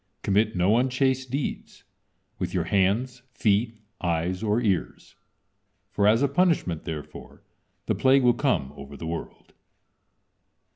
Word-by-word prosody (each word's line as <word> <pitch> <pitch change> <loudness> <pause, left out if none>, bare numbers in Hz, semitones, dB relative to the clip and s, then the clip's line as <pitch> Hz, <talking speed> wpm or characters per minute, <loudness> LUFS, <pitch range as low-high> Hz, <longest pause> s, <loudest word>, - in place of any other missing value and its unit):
Commit 105 +2 +1
no 95 +5 +3
unchaste 130 +1 +1
deeds, 135 +2 -4 0.6
with - - -3
your - - +1
hands, 110 +6 0
feet, 110 +1 +1 0.2
eyes, 85 +2 -1
or 110 +1 +1
ears, 100 -7 -2 0.8
for 100 0 +2
as 115 +5 +4
a - - +4
punishment 140 - +1
therefore 80 -3 -8 0.4
the - - 0
plague 135 0 +4
will 120 -1 +5
come 80 - 0
over 70 0 -10
the 80 - -7
world." 80 +1 -7
110 Hz, 130 wpm, -25 LUFS, 90-130 Hz, 0.8 s, will